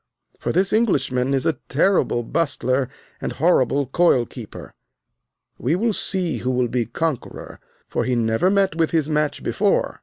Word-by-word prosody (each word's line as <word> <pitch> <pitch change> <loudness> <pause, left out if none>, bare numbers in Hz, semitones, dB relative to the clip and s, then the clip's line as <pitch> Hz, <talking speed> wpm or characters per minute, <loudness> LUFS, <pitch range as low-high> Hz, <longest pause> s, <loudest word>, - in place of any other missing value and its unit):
For - - -2
this 190 +3 +1
Englishman 140 - +1
is 135 -2 0
a 160 -6 0
terrible 145 -5 +2
bustler 130 -2 0 0.3
and - - -3
horrible 140 -4 +2
coil 130 -2 +3
keeper. - - -10 0.9
We 140 +7 +1
will 220 +4 +1
see 185 -4 -2
who 125 - -3
will 125 -1 +1
be 120 -2 -1
conqueror, 150 +2 -4 0.3
for - - -1
he 125 - 0
never 115 +8 +2
met 195 -2 +2
with 165 -1 +1
his 160 -3 +1
match 150 -1 -1
before. - - 0
145 Hz, 155 wpm, -22 LUFS, 125-175 Hz, 0.9 s, coil